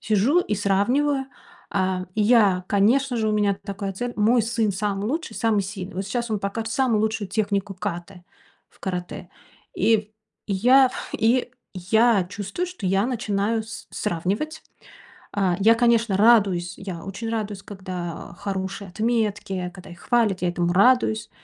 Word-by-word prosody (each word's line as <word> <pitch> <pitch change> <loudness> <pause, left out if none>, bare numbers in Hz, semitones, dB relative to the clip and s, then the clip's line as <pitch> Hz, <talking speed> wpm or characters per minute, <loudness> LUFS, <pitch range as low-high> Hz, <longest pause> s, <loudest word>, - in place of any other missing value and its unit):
сижу 225 - +3
и 210 - -2
сравниваю, 250 +8 +1 0.5
э, 185 -1 0
и 215 - 0
я, 205 -5 +4
конечно 240 +6 +2
же, 220 -1 0
у - - +1
меня 205 -2 +2
такая 200 -1 -4
цель. 245 +5 -4
Мой 225 +3 +3
сын 225 -2 0
самый 200 +1 -2
лучший, 320 +7 -3
самый 220 -3 +1
сильный. 190 -1 -7
Вот 190 +1 -3
сейчас 235 +3 -3
он 210 - 0
покажет 225 +3 -3
самую 235 -4 +2
лучшую 215 -2 -1
технику 200 -1 -1
ката 175 0 -6 0.4
в - - -27
каратэ. 180 -2 -5 0.5
И 215 -1 +2 0.3
я 250 +7 +5 0.3
и 245 +3 +2 0.2
я 205 +2 +3
чувствую, 205 - -4
что 360 - -9
я 195 +4 +2
начинаю 220 -2 -1
с 220 0 -9
сравнивать. 210 - -2 0.7
Э, 190 -3 +2
я, 225 +3 +5
конечно, 230 -3 +2
радуюсь. 195 -6 +4
Я 185 -4 -7
очень 200 +4 -5
радуюсь, 210 -3 -3
когда, 185 -4 -6
э, - - -16
хорошие 195 0 -4
отметки, 210 -4 -1
когда 185 -1 -12
их 175 - -12
хвалят, 225 -6 +1
я 180 - +1
этому 175 0 0
радуюсь. 175 - +3
205 Hz, 155 wpm, -23 LUFS, 190-230 Hz, 0.7 s, я